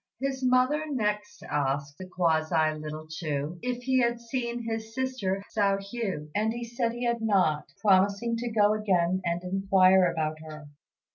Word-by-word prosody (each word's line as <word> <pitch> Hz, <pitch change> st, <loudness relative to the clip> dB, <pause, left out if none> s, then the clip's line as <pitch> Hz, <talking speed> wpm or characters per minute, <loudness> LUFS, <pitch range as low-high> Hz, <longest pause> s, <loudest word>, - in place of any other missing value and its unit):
His 265 Hz, 0 st, -2 dB
mother 255 Hz, +5 st, +2 dB
next 210 Hz, -6 st, -2 dB
asked 140 Hz, 0 st, -2 dB
(the 185 Hz, -, -7 dB
quasi) 160 Hz, -3 st, +1 dB
little 155 Hz, 0 st, -7 dB
Chu 155 Hz, 0 st, -4 dB
if 245 Hz, 0 st, -3 dB
he 260 Hz, 0 st, +2 dB
had 235 Hz, 0 st, +1 dB
seen 235 Hz, 0 st, -3 dB
his 225 Hz, 0 st, -5 dB
sister, 255 Hz, -8 st, -2 dB
Hsiao 200 Hz, -2 st, +2 dB
hui; 195 Hz, -6 st, -4 dB
and 215 Hz, +2 st, +1 dB
he 235 Hz, +1 st, -5 dB
said 235 Hz, 0 st, -2 dB
he 240 Hz, +1 st, -4 dB
had 235 Hz, -1 st, 0 dB
not, 185 Hz, -9 st, +2 dB
promising 200 Hz, +3 st, +3 dB
to 240 Hz, +1 st, -3 dB
go 210 Hz, -2 st, +3 dB
again 185 Hz, -4 st, +1 dB
and 170 Hz, 0 st, -1 dB
inquire 190 Hz, 0 st, +4 dB
about 155 Hz, -1 st, -2 dB
her. 155 Hz, -2 st, -10 dB
200 Hz, 160 wpm, -28 LUFS, 170-235 Hz, -, inquire